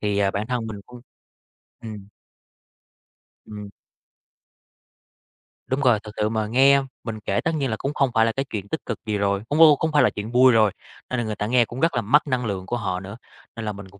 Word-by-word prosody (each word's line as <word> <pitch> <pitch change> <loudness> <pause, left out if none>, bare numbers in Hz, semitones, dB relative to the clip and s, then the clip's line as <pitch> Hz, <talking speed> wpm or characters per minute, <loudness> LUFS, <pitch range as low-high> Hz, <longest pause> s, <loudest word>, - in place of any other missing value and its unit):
Thì, 105 -1 -1
à, 100 -1 +2
bản 105 +2 -3
thân 125 -2 -2
mình 105 -2 -7
cũng. 125 0 -13 0.8
Ừm. 105 -3 -9 1.4
Ừm. 105 -1 -9 2.0
Đúng 130 - -1
rồi, 125 -6 +4
thực 105 - -9
sự 105 0 +1
mà 110 -1 -1
nghe 135 +4 +5 0.2
mình 110 -2 -5
kể 100 -2 -1
tất 165 - 0
nhiên 140 -4 -1
là 110 - -1
cũng 140 - -3
không 135 -3 +1
phải 115 -2 +4
là 115 - +1
cái 135 +4 -3
chuyện 100 -2 -5
tích 160 - -4
cực 115 - -4
gì 105 -2 -1
rồi, 100 0 0
cũng, 150 +2 0
ô 155 -2 +8
không 160 +3 -2
phải 150 - +4
là - - +4
chuyện 105 +2 -6
vui 130 +1 +6
rồi, 110 -3 +4 0.4
nên 125 - -2
là 120 - -2
người 110 -1 -3
ta 105 0 -3
nghe 120 0 +3
cũng 120 +3 -8
rất 165 +3 +1
là - - +1
mất 145 +9 +3
năng 125 -3 -1
lượng 95 -3 -3
của 120 - -2
họ 95 -5 -3
nữa, 100 +3 -9 0.4
nên 115 - -6
là 105 - -2
mình 100 -1 -10
cũng 100 +1 -19
110 Hz, 235 wpm, -23 LUFS, 105-130 Hz, 2.0 s, ô